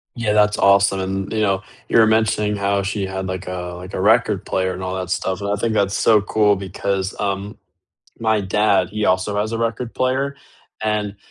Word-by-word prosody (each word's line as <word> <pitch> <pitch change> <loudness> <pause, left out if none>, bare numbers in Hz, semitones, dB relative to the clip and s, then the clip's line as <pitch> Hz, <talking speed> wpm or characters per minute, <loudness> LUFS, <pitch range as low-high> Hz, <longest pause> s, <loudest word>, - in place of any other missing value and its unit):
Yeah, 115 -4 0
that's 105 0 +3
awesome, 100 0 +4
and, 95 0 -3
you 110 - -1
know, 95 -2 +1 0.3
you - - +2
were 115 - +7
mentioning 110 -1 +1
how 100 0 0
she 100 +1 -2
had, 95 0 -4
like, 95 0 -5
a 90 -1 -5
like, 90 +1 -10
a - - -2
record 110 -1 +3
player 95 0 -1
and 95 - -6
all 95 0 -3
that 90 -1 -4
stuff, 95 0 -1
and 100 0 -3
I 100 - +1
think 110 +2 -1
that's 100 -2 +1
so 110 -2 +4
cool 105 0 +2
because, 95 0 -3
um, 100 0 -3 0.6
my 110 -1 +2
dad, 100 -1 +2
he 105 0 -1
also 95 +2 +1
has 110 +1 -2
a 115 - -3
record 115 +1 -2
player, 135 +2 -1 0.5
and 105 -2 -1
100 Hz, 205 wpm, -20 LUFS, 95-110 Hz, 0.6 s, were